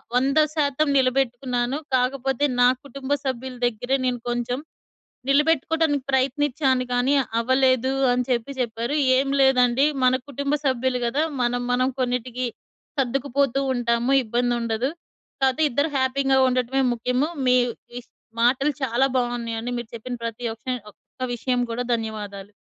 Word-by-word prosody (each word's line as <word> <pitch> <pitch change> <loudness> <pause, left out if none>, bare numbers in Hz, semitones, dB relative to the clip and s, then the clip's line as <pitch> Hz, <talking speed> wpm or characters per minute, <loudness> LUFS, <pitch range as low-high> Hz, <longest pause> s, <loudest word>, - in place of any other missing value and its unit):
100% 295 +2 +2
నిలబెట్టుకున్నాను. 255 -1 0 0.2
కాకపోతే 265 +2 0 0.2
నా 245 - +7 0.2
కుటుంబ 275 0 -8 0.2
సభ్యుల 260 -1 -4
దగ్గరే 245 +4 -1
నేను 250 -1 0
కొంచెం 240 +2 -2 0.7
నిలబెట్టుకోవడానికి 300 0 +2
ప్రయత్నించాను 265 0 +1
కానీ 245 +3 +2 0.3
అవ్వలేదు 260 +1 +2 0.2
అని 250 0 +1
చెప్పి 245 +2 -1
చెప్పారు. 235 +4 -2 0.2
ఏం 275 - +1
లేదండి 255 0 +4 0.2
మన 255 0 +5
కుటుంబ 280 +2 -1
సభ్యులు 260 -1 +1
కదా! 275 +6 +1 0.2
మనం, 245 0 0
మనం 255 +1 +2
కొన్నిటికి 250 0 -1 0.5
సర్దుకుపోతూ 275 +1 0
ఉంటాము, 240 +1 0
ఇబ్బందుండదు. 240 +1 0 0.5
కాపోతే 265 +4 +2
ఇద్దరు 285 +5 0
హ్యాపీగా 265 +1 +2
ఉండటమే 255 +1 0
ముఖ్యము. 250 +4 0 0.2
మీ 250 - +5 0.4
ఈ - - -10 0.4
మాటలు 265 +5 +3
చాలా 260 +1 +2
బావున్నాయండి. 240 -1 -2
మీరు 235 - -8
చెప్పిన 245 +2 -5
ప్రతి 230 +1 -5
ఒక్ 225 - -39 0.3
ఒక్క 255 +4 -8
విషయం 245 +1 -1
కూడా. 245 +2 -3
ధన్యవాదాలు. 210 -3 -6
255 Hz, 120 wpm, -23 LUFS, 240-270 Hz, 0.7 s, నా